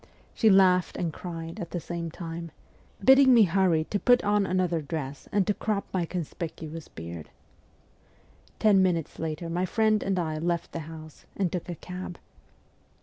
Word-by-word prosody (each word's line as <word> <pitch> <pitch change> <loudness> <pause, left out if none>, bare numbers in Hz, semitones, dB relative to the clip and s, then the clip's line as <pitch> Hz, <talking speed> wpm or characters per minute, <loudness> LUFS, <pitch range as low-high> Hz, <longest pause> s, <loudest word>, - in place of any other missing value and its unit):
She 220 - +4
laughed 185 -2 +4
and 165 -3 -2
cried 165 -1 -7
at 170 - -5
the 175 - -3
same 170 0 -5
time, 165 0 -6 0.6
bidding 265 0 +7
me 230 - +8
hurry 180 -3 +2
to 205 - +1
put 245 +3 +4
on 205 -1 +2
another 180 -3 0
dress 145 -2 -6
and 200 -2 +2
to 210 - +1
crop 210 -1 -2
my 180 -3 0
conspicuous 165 -2 -6
beard. 85 -1 -8 1.3
Ten 205 -3 +5
minutes 175 -4 0
later 160 +1 -3
my 175 +3 -1
friend 215 +1 +2
and 195 -1 -1
I 160 -3 -1
left 170 +1 -1
the - - -4
house 155 -1 -11
and 190 -4 0
took 180 -1 -4
a 175 - -3
cab. 180 +2 -7
175 Hz, 165 wpm, -27 LUFS, 165-195 Hz, 1.3 s, me